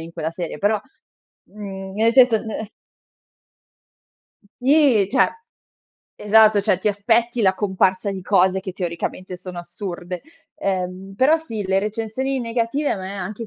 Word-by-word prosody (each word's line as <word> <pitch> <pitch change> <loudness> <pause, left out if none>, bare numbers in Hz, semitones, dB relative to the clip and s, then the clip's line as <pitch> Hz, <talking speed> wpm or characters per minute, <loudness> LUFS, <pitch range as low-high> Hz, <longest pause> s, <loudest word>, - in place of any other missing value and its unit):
in 165 +1 -9
quella 160 0 -3
serie, 170 -2 -6
però, 205 +3 +2 0.7
mhmm, 195 -2 -8
nel 225 +3 +3
senso 245 -4 +5
ne 220 -1 -5 1.9
Si, 270 -8 +4
cioè - - +3 0.9
esatto, 215 0 +5
cioè 200 -2 +2
ti 190 - -2
aspetti 230 +4 +1
la 190 -2 +3
comparsa 190 0 +1
di 190 -1 -6
cose 190 0 +3
che 190 -1 -7
teoricamente 180 +1 -4
sono 180 0 -9
assurde. 175 0 -6 0.3
Ehm, 190 0 -3
però 265 +7 +4
sì, 225 -11 -5
le 190 0 +2
recensioni 225 +6 -2
negative 235 +5 -1
a - - -1
me 190 0 -6
anche 195 +5 -5
200 Hz, 140 wpm, -21 LUFS, 185-225 Hz, 1.9 s, senso